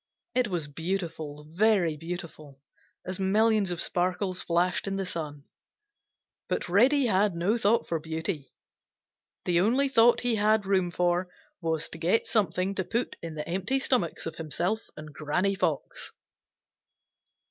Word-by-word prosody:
It 250 -2 +2
was 175 -6 -2
beautiful, 160 -2 -4
very 185 -3 +3
beautiful, 155 -3 -7 0.5
as 185 +1 -4
millions 210 +1 +3
of 175 -1 -3
sparkles 185 +1 0
flashed 180 +3 +1
in 195 - -1
the 195 0 -2
sun. 150 -5 -5 1.1
But - - -1
Reddy 255 +10 +4
had 200 -3 +3
no 180 +6 +1
thought 230 0 +2
for 165 - -1
beauty; 160 -1 -4 0.9
the 175 -1 +3
only 245 +9 +3
thought 240 -3 +5
he 245 -2 +1
had 215 0 +3
room 190 -2 +2
for 175 +1 0 0.3
was 160 -2 0
to 165 - -6
get 175 +7 +2
something 190 -2 +1
to 190 - -1
put 230 +7 -2
in 165 -2 -6
the 150 0 -5
empty 190 +9 0
stomachs 250 -10 0
of 165 -1 -5
himself 175 +7 -2
and 155 -1 -9
Granny 180 +7 0
Fox. 195 - -2
180 Hz, 145 wpm, -28 LUFS, 165-210 Hz, 1.1 s, thought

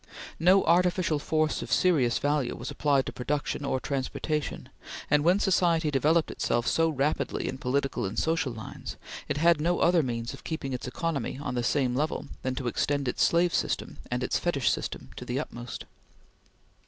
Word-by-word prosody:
No 185 +4 +5
artificial 175 -2 +2
force 155 +1 0
of - - -7
serious 140 -11 +3
value 145 -3 0
was - - -6
applied 140 -3 +2
to - - -4
production 145 +3 -2
or 130 -2 0
transportation, 140 +3 -3 0.4
and 150 0 +4
when 180 +4 +4
society 175 -5 +2
developed 155 +4 +2
itself 120 0 0
so 165 0 +2
rapidly 145 0 -1
in 130 - -4
political 135 +2 -1
and 95 +4 -4
social 160 -4 +1
lines, 110 -1 -8 0.3
it - - 0
had 165 0 +4
no 175 +3 +2
other 175 -1 +4
means 120 -3 -3
of - - -11
keeping 155 -5 -4
its 125 - -4
economy 140 -2 -2
on 140 -3 -3
the 120 - 0
same 125 0 +1
level 150 +4 -1 0.2
than 130 0 -2
to 130 - -4
extend 140 +3 0
its 125 - -1
slave 170 0 +3
system - - -1
and 125 +1 -1
its - - 0
fetish 145 -8 +1
system - - -4
to - - -6
the - - -2
utmost. - - -6
145 Hz, 180 wpm, -28 LUFS, 130-165 Hz, 0.4 s, No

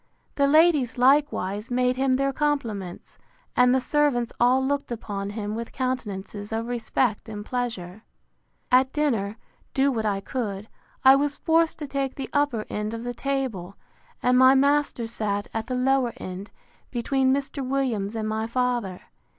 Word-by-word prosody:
The 280 -1 +2
ladies, 300 -5 +4
likewise, 250 -5 +2
made 250 0 +1
him 265 0 +2
their 275 +1 0
compliments; 230 -12 -3 0.4
and 250 0 +5
the 260 - +4
servants 260 -3 +1
all 255 +2 +4
looked 280 -1 -1
upon 200 -3 -4
him 210 0 -4
with 230 +1 -5
countenances 210 -5 -4
of 225 +1 -2
respect 235 -1 -1
and 205 -1 -6
pleasure. 220 -7 -4 0.7
At 260 +1 +5
dinner, 230 -9 0 0.4
do 275 +1 +3
what 220 -4 -1
I 200 -1 0
could, 205 -2 -4 0.4
I 265 +1 +9
was 285 +1 0
forced 325 +1 +2
to 295 - -6
take 275 -1 -2
the 270 - -6
upper 285 -7 +1
end 210 +2 -3
of 230 - -6
the 245 0 -3
table; 240 -9 -3 0.5
and 250 0 +4
my 260 +1 +7
master 280 -3 +2
sat 210 -3 -2
at 225 0 -3
the 255 - -2
lower 255 -1 +2
end, 185 0 -7 0.4
between 260 +2 +1
Mr. 275 0 -2
Williams 250 -6 -1
and 220 -1 -2
my 220 +1 -2
father. 240 -6 -1
245 Hz, 160 wpm, -25 LUFS, 215-270 Hz, 0.7 s, I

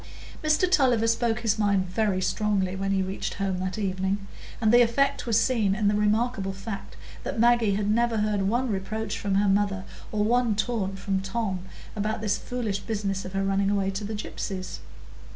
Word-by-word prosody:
Mr 310 +4 +3
Tulliver 260 -10 +3
spoke 230 0 +1
his 220 -2 +1
mind 200 -3 +2
very 185 0 0
strongly 190 0 0
when 195 +1 -2
he 195 -1 +2
reached 190 +1 -4
home 195 -2 -1
that 185 +1 -3
evening; 195 0 -1 0.3
and 220 -1 +3
the 245 - +8
effect 275 +3 +2
was 225 -1 +4
seen 225 -6 +2
in 210 0 +1
the 205 - +3
remarkable 210 -1 +1
fact 195 +1 -7 0.3
that - - -3
Maggie 235 -4 +4
never 225 +3 +1
heard 210 -1 +1
one 235 +5 +1
reproach 215 +3 -3
from 200 -1 -1
her 200 +1 +3
mother, 195 -1 +1 0.3
or 210 -1 +1
one 235 0 +2
taunt 205 -3 -1
from 195 0 -1
Tom, 195 0 -2 0.4
about 215 +1 -1
this 210 -2 0
foolish 225 -5 -3
business 200 -3 -3
of 185 - -7
her 195 0 0
running 195 0 +1
away 195 -1 +1
to 195 +2 -4
the 215 +1 -4
gypsies. 190 -2 -5
205 Hz, 185 wpm, -26 LUFS, 195-225 Hz, 0.4 s, the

